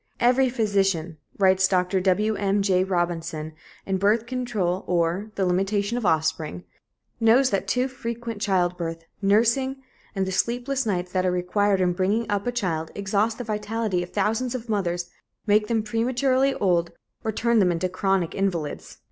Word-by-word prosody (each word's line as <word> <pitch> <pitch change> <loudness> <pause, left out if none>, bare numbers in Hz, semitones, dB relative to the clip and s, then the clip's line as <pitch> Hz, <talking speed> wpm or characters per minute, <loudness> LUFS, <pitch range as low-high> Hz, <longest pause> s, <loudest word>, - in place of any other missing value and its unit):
"Every 255 +2 +4
physician," 195 -8 0 0.2
writes 190 -1 +4
Dr. 185 0 +1
Wm. 200 +1 +1
J. 185 -2 +3
Robinson 170 -4 -2 0.3
in 190 -1 0
Birth 215 +4 +2
Control 225 -8 -2
or 175 +4 0
The 195 - 0
Limitation 200 +4 0
of 240 -5 -1
Offspring, 155 - 0 0.6
"knows 240 +3 +4
that 195 0 -1
too 250 +6 +1
frequent 235 -4 -6
childbirth, 175 -5 -1 0.2
nursing 235 +7 +2 0.4
and 195 -1 0
the 190 - -3
sleepless 245 +6 -1
nights 180 -3 -1
that 185 -1 0
are 185 - +2
required 190 +3 +1
in 180 -1 +2
bringing 200 +5 0
up 205 +2 -1
a - - +1
child 170 -9 -2
exhaust 205 +3 0
the 245 - -4
vitality 215 -3 -2
of 175 - -6
thousands 225 +5 -1
of 240 -2 -6
mothers, 175 -4 -1 0.4
make 210 0 +3
them 225 -1 0
prematurely 255 +4 +1
old, 170 -3 +1 0.3
or 220 - -1
turn 235 +2 +2
them 185 -3 +4
into 170 +2 -1
chronic 185 -2 0
invalids." 175 -6 -3
200 Hz, 155 wpm, -24 LUFS, 180-225 Hz, 0.6 s, Every